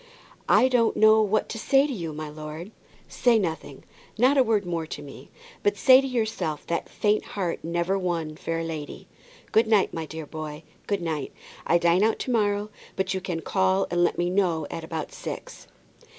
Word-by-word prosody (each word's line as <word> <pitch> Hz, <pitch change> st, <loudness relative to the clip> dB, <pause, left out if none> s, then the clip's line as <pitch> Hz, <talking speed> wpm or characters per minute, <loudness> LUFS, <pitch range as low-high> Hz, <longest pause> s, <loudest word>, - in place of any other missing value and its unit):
"I 255 Hz, -, +6 dB
don't 245 Hz, -3 st, +2 dB
know 220 Hz, 0 st, +6 dB
what 215 Hz, 0 st, +1 dB
to 225 Hz, -, -5 dB
say 270 Hz, +5 st, +4 dB
to 290 Hz, -, -3 dB
you, 170 Hz, -8 st, -4 dB
my 155 Hz, 0 st, -6 dB
lord." 155 Hz, +5 st, -8 dB, 0.4 s
"Say 240 Hz, -2 st, +3 dB
nothing, 160 Hz, -8 st, -4 dB, 0.3 s
not 255 Hz, +5 st, +4 dB
a 270 Hz, -, +5 dB
word 220 Hz, -5 st, +1 dB
more 170 Hz, -2 st, -3 dB
to 145 Hz, -, -7 dB
me. 140 Hz, -2 st, -12 dB, 0.3 s
But 410 Hz, -, +1 dB
say 260 Hz, -1 st, +7 dB
to 270 Hz, -, -3 dB
yourself 215 Hz, -, -2 dB
that 170 Hz, -, -3 dB
faint 210 Hz, 0 st, +1 dB
heart 180 Hz, -4 st, -2 dB
never 170 Hz, +3 st, 0 dB
won 165 Hz, -4 st, -2 dB
fair 165 Hz, +1 st, -3 dB
lady. 155 Hz, -3 st, -6 dB, 0.4 s
Good 220 Hz, +1 st, +4 dB
night, 215 Hz, -3 st, +3 dB
my 165 Hz, -1 st, -4 dB
dear 160 Hz, 0 st, -7 dB
boy, 155 Hz, 0 st, -7 dB, 0.2 s
good 200 Hz, -4 st, -1 dB
night. 155 Hz, -4 st, -3 dB, 0.4 s
I 170 Hz, -, +5 dB
dine 170 Hz, +3 st, +3 dB
out 220 Hz, +1 st, +2 dB
to 255 Hz, -, -3 dB
morrow, 205 Hz, -2 st, 0 dB, 0.2 s
but 190 Hz, 0 st, -1 dB
you 190 Hz, -, -3 dB
can 175 Hz, -3 st, -3 dB
call 190 Hz, +2 st, +1 dB
and 175 Hz, 0 st, +2 dB
let 175 Hz, -, +1 dB
me 175 Hz, 0 st, 0 dB
know 175 Hz, -5 st, +1 dB
at 165 Hz, -, -5 dB
about 160 Hz, -2 st, -5 dB
six." -, -, -8 dB
180 Hz, 195 wpm, -25 LUFS, 160-215 Hz, 0.4 s, say